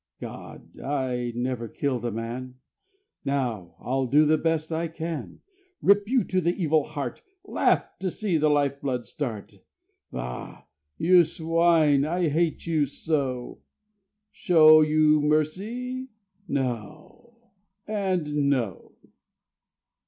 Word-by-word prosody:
God! - - -10
I 130 -3 -2
never 120 -1 -2
killed 130 -1 -2
a 120 - -1
man: 120 +3 -5 0.7
Now 120 -10 -2
I'll 130 +1 -1
do 150 +5 +5
the 155 +1 +4
best 160 -1 -1
I 165 +1 -1
can. 160 -3 -6 0.4
Rip 205 +1 +3
you 255 -2 +3
to 185 -1 0
the 175 +1 +1
evil 155 -3 +2
heart, 140 -4 -5 0.2
Laugh - - +1
to 190 - -1
see 185 -2 -1
the 155 0 +3
life 140 -1 +1
blood 125 -4 -2
start. 110 -7 -6 0.5
Bah! 60 0 -6 0.3
You 175 +2 +6
swine! 160 -3 +2
I 170 +2 0
hate 160 +2 0
you 155 -4 +1
so. 135 -4 -3 0.7
Show 155 -6 +6
you 155 0 +4
mercy? 210 - -1 0.4
No!... 140 - -5 0.5
and 180 -9 0
no! 120 -10 -2
150 Hz, 115 wpm, -26 LUFS, 130-170 Hz, 0.7 s, You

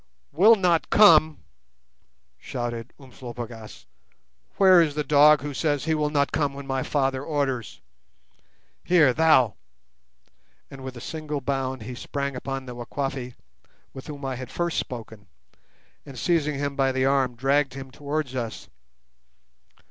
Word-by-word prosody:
"Will 200 +10 +6
not 180 -5 +1
come!" 160 -7 +5 1.0
shouted 120 -1 -5
Umslopogaas; 120 -4 -10 0.7
"where 185 -3 +7
is 150 -3 0
the 150 - -1
dog 150 0 +5
who 145 +1 -5
says 145 0 -1
he 160 - +1
will 150 -1 0
not 140 -1 0
come 145 -3 -1
when 140 0 -8
my 135 -1 -2
Father 135 -1 -1
orders? 140 -7 -3 1.0
Here, 160 -7 +4
thou"—and 125 - -2
with 130 -1 -7
a - - -9
single 155 -1 -5
bound 130 -2 -3
he 125 - -7
sprang 140 +2 -4
upon 135 +1 -5
the 125 - -8
Wakwafi 125 +1 -5 0.6
with 135 - -10
whom 145 -2 -7
I 130 -2 -3
had 130 0 -8
first 170 -1 -2
spoken, 110 -5 -8 0.8
and, 135 -3 -12
seizing 150 +1 0
him 140 0 -3
by 135 -1 +1
the 130 0 0
arm, 135 -2 +1
dragged 135 +2 +1
him 135 -1 -8
towards 145 -1 -4
us. 120 -4 -5
135 Hz, 140 wpm, -25 LUFS, 130-150 Hz, 1.0 s, where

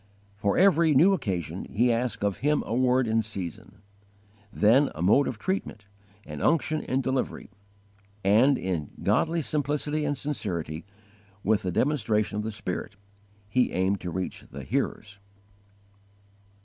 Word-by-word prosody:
_ - - -33 0.3
For 100 -1 0
every 170 -5 +5
new 175 +9 +6
occasion 90 - -3
he 120 +3 +2
asked 120 -2 -2
of 100 -3 0
Him 150 +2 +1
a - - -4
word 125 0 +2
in 110 0 +2
season; 100 -1 -7 0.7
then 120 +8 +4
a 80 - -6
mode 125 +9 +4
of 120 - -3
treatment, 150 - -3 0.4
and 75 -1 -7
unction 155 -1 +1
in 130 +1 -1
delivery; 130 -4 -2 0.7
and, 115 +8 +4
in 85 -6 -3
godly 165 0 +1
simplicity 150 +1 -1
and 145 -1 -1
sincerity, 90 - -3 0.6
with 105 0 +2
the 90 - -2
demonstration 110 - +1
of 105 - -2
the 110 - -3
Spirit, 100 -1 -5 0.5
he 125 +5 +1
aimed 95 +2 0
to 90 - -4
reach 95 +2 -4
the 70 +1 -8
hearers. 100 +9 -3
110 Hz, 145 wpm, -27 LUFS, 95-145 Hz, 0.7 s, new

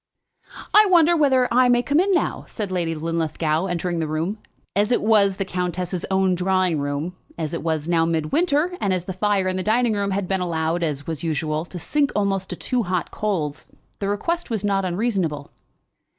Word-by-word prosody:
"I 425 0 +7
wonder 345 -1 +5
whether 265 -5 +3
I 250 0 +5
may 245 0 +3
come 285 +5 +2
in 390 +3 +2
now," 365 - 0
said 205 -4 -5
Lady 170 -3 -1
Linlithgow, 160 +1 -1
entering 175 -1 -2
the 160 - -1
room. 165 +8 -2 0.4
As 205 +3 +2
it 245 - +3
was 205 -3 +4
the 195 - -1
countess's 180 -1 -3
own 190 -1 +2
drawing 180 -2 +1
room, 145 +5 -3 0.2
as 160 -2 -3
it 170 - -3
was 160 -2 -2
now 170 -1 +3
mid 160 -2 -1
winter, 340 +1 +1
and 195 -2 +1
as 180 -1 -2
the 190 - -4
fire 195 0 +1
in 185 0 -1
the - - -1
dining 225 +3 +2
room 200 -1 -1
had 195 -1 -1
been 190 0 0
allowed, 165 -1 -1
as 145 -4 -2
was 160 -3 -4
usual, 155 0 -1
to 180 - -9
sink 285 - 0
almost 195 -2 0
to - - -4
two 250 -2 -1
hot 180 -4 -2
coals, 160 -9 -2 0.3
the 200 - -2
request 335 +13 -2
was 220 -4 -2
not 195 -2 +1
unreasonable. 180 -7 -1
185 Hz, 200 wpm, -22 LUFS, 165-215 Hz, 0.4 s, I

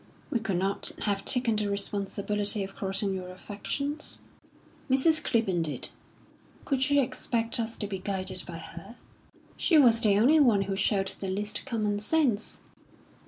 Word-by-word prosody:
"We 240 - +1
could 200 -5 -1
not 195 +2 0
have 200 -2 0
taken 245 -4 +3
the 210 -1 0
responsibility 200 +1 -1
of 195 0 -8
crossing 195 0 -1
your 185 -1 -5
affections." 280 +10 -4 0.7
"Mrs. 290 +5 +4
Clibborn 195 -7 +1
did." 150 -6 -3 0.8
"Could 265 -1 +1
you 285 0 +4
expect 235 -2 -2
us 230 0 -2
to 210 - -3
be 195 -2 -4
guided 190 0 -4
by 170 -2 -6
her?" 170 +6 -10 0.6
"She 330 - +3
was 235 -5 +6
the 205 -4 +4
only 275 +9 +5
one 230 -9 +4
who 195 0 -3
showed 195 -1 +1
the 195 - -6
least 205 +6 -3
common 210 -5 -1
sense." 235 -2 +1
210 Hz, 155 wpm, -28 LUFS, 195-240 Hz, 0.8 s, was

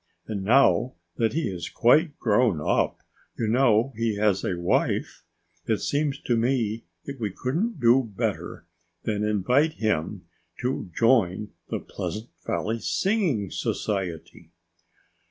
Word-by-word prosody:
And 100 -3 -4
now 125 +1 +4 0.2
that 115 -1 +1
he 165 +2 0
is 90 -3 -5
quite 145 +6 +3
grown 110 -5 +2
up 75 - 0 0.4
you 115 - -1
know 120 +1 +3
he 115 -1 0
has 100 -2 +1
a 90 - -1
wife 85 - 0 0.4
it 110 - +2
seems 145 +2 -1
to 120 - 0
me 115 -2 0 0.2
that 140 -2 -7
we 110 -3 -1
couldn't 160 - -2
do 120 -1 +4
better - - -3 0.4
than 105 -1 -1
invite 125 - +2
him 95 - -2 0.4
to 125 -6 -2
join 105 -4 +2 0.2
the - - -2
Pleasant 110 +3 -6 0.2
Valley 115 +2 -1
Singing 175 - 0
Society." 90 -4 -3
115 Hz, 130 wpm, -25 LUFS, 105-130 Hz, 0.4 s, now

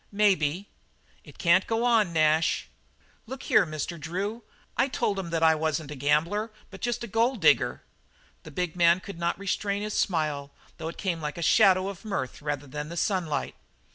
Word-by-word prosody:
"Maybe." 195 -3 +2 0.6
"It - - -15
can't 180 +2 +3
go 225 +1 0
on, 225 -6 +3
Nash." 155 0 +2 0.6
"Look 265 +2 -7
here, - - +4
Mr. 155 +2 -4
Drew. 195 +9 -3 0.3
I 270 - +2
told 205 -6 -1
'em 180 -3 -5
that 165 -1 -1
I 160 0 +6
wasn't 155 -1 -2
a - - -5
gambler 160 - +1 0.2
but 195 - -11
just 240 0 -2
a - - -4
gold 230 +3 +1
digger." 160 - +3 0.6
The - - -11
big 175 +3 -3
man 170 0 +5
could 185 -2 -9
not 170 0 0
restrain 200 +1 -2
his 210 0 -3
smile, 150 -6 0 0.3
though 160 - -4
it 165 - -7
came 175 -5 -2
like 150 +1 -4
a 170 - -3
shadow 185 +2 +5
of 200 0 -7
mirth 195 - -4
rather 145 -1 -3
than 150 +2 -6
the 170 - -7
sunlight. 175 -5 -1
175 Hz, 185 wpm, -27 LUFS, 155-205 Hz, 0.6 s, I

